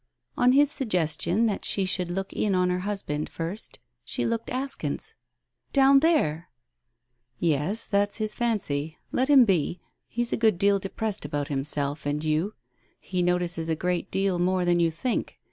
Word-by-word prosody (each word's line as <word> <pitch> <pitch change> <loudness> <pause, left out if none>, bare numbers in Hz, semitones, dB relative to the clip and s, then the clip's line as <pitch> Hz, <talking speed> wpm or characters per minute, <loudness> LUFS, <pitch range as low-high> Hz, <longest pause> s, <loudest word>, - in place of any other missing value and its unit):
On 250 +1 +4
his 290 +1 +5
suggestion 180 - +1
that 210 -3 -1
she 195 - +2
should 185 -1 +1
look 195 +2 -4
in) 200 -3 0
on 180 0 +2
her 180 - -1
husband 185 -7 -3
first 170 +6 -5 0.3
she - - -2
looked 230 0 -2
askance. 255 - -4 0.6
"Down 275 0 +6
there!" 185 - +1 0.9
"Yes, 165 - 0
that's 205 0 +1
his 215 -1 -1
fancy. 165 -10 -1
Let 260 - +1
him 270 -4 +7
be. 180 -3 0 0.3
He 240 - -2
is 235 - -3
a - - +1
good 220 -5 +3
deal 200 +2 +3
depressed 205 +2 -3
about 145 0 -3
himself 145 +1 0
and 145 +1 -1
you. 155 +7 0 0.4
He 180 -1 -2
notices 175 -2 0
a 160 - +1
great 180 +3 -2
deal 195 -2 0
more 180 0 +1
than 175 0 +3
you 170 -1 +3
think. 195 +10 -3
185 Hz, 165 wpm, -26 LUFS, 160-220 Hz, 0.9 s, him